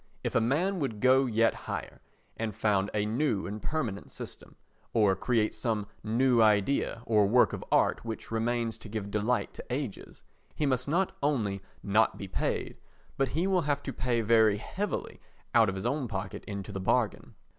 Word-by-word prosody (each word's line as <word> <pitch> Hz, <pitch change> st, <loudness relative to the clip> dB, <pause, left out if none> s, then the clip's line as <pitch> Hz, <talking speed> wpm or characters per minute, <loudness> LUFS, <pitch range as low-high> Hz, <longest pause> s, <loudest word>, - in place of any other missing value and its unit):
If -, -, -2 dB
a -, -, +3 dB
man 170 Hz, -, +1 dB
would 115 Hz, -8 st, -2 dB
go 130 Hz, +2 st, +5 dB
yet 115 Hz, -1 st, +3 dB, 0.2 s
higher -, -, -5 dB, 0.3 s
and 110 Hz, -3 st, -3 dB
found 100 Hz, -2 st, +1 dB
a 105 Hz, -1 st, 0 dB
new 110 Hz, -1 st, 0 dB
and 105 Hz, +2 st, -5 dB
permanent 125 Hz, -11 st, -3 dB
system, -, -, -10 dB, 0.4 s
or 105 Hz, -4 st, +4 dB
create 110 Hz, +2 st, +1 dB
some 110 Hz, -4 st, -1 dB, 0.2 s
new 120 Hz, +2 st, +3 dB
idea 110 Hz, +2 st, +2 dB
or 105 Hz, -3 st, +4 dB
work 120 Hz, +4 st, +4 dB
of -, -, -4 dB
art -, -, +3 dB
which 115 Hz, -1 st, -6 dB
remains 115 Hz, 0 st, -1 dB
to 115 Hz, -, -10 dB
give 100 Hz, -1 st, -4 dB
delight 105 Hz, +4 st, 0 dB
to -, -, -9 dB
ages—he 135 Hz, +3 st, -5 dB
must 130 Hz, -2 st, 0 dB
not 175 Hz, +6 st, +1 dB
only 110 Hz, -9 st, 0 dB, 0.2 s
not 110 Hz, +2 st, +3 dB
be 100 Hz, -, -6 dB
paid, 95 Hz, -, -2 dB, 0.4 s
but 135 Hz, -, +1 dB
he 170 Hz, -, +2 dB
will 190 Hz, -2 st, +2 dB
have 145 Hz, -, 0 dB
to 135 Hz, -, -4 dB
pay 120 Hz, -1 st, 0 dB
very 110 Hz, -2 st, +4 dB
heavily 200 Hz, -, -4 dB, 0.3 s
out -, -, +5 dB
of 95 Hz, -, -3 dB
his 95 Hz, -, -5 dB
own 135 Hz, +1 st, 0 dB
pocket 95 Hz, -3 st, -5 dB
into 100 Hz, 0 st, -5 dB
the 95 Hz, -1 st, -4 dB
bargain. 95 Hz, -, 0 dB
115 Hz, 175 wpm, -29 LUFS, 105-130 Hz, 0.4 s, go